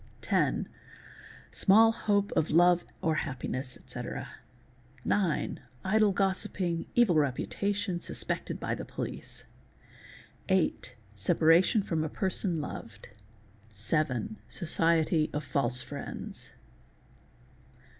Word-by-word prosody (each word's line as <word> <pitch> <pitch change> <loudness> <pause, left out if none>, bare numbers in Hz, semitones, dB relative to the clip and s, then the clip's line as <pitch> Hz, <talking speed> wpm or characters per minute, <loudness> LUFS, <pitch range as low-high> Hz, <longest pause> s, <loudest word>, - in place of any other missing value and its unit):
Ten—small 220 +3 +1
hope 205 -3 0
of 155 - +1
love 175 +2 +5 0.2
or 160 - +2
happiness, 130 -1 -4
etc. - - -6 0.8
Nine—idle 195 - +1
gossiping, 185 -3 -1
evil 240 -7 +5
reputation, 185 - 0
suspected - - -3
by - - -2
the - - -4
'police. - - -6 1.1
Hight—separation 160 - +2
from 165 -4 -1
a 155 - -2
person 190 -2 0
loved. 115 -7 -7 0.6
Seven—socicty 160 - 0
of 150 - -1
false 130 -2 +1
friends. 140 +1 -7
165 Hz, 80 wpm, -30 LUFS, 140-195 Hz, 1.1 s, love